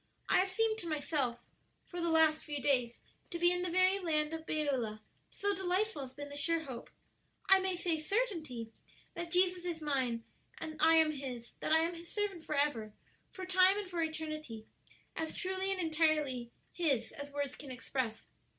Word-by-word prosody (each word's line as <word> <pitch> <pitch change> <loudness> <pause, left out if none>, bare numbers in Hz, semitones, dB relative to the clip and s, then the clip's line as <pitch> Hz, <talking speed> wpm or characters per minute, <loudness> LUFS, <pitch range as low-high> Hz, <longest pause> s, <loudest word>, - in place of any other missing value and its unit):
I - - +5
have 380 +1 +2
seemed 440 +3 +1
to 340 - -5
myself, 290 -5 0 0.5
for 350 -1 -6
the 340 - +1
last 320 -1 +4
few 295 -2 -4
days, 250 -4 +2 0.3
to 345 - -4
be 345 +1 +4
in 360 0 0
the 360 - -1
very 370 +2 +4
land 310 -3 +1
of 320 0 -6
Beulah, 260 -8 0 0.3
so 405 0 +1
delightful 380 -1 0
has 260 -2 -7
been 290 0 -7
the 285 - -8
sure 330 +3 +1
hope 260 -6 -7 0.6
I 385 0 +8
may 380 -1 0
say 345 -2 0
certainty 310 - -2 0.4
that 340 0 -5
Jesus 360 0 +3
is 345 -2 -3
mine 260 -6 0 0.3
and 315 -1 -6
I 325 +1 +7
am 320 -1 +6
His; 255 -5 -6
that - - -2
I 320 0 +6
am 335 +2 0
His 340 0 -9
servant 405 -5 -2
forever, 280 -8 +1 0.4
for 375 - -7
time 370 +1 +5
and 410 -2 -3
for 345 -1 -1
eternity, 310 -8 -4 0.5
as 320 -1 -3
truly 380 +1 -1
and 385 - -1
entirely 310 -7 +1 0.2
His 275 -10 +1
as 285 0 -8
words 285 -1 -2
can 285 - -8
express. 255 -3 -3
320 Hz, 185 wpm, -34 LUFS, 280-360 Hz, 0.6 s, I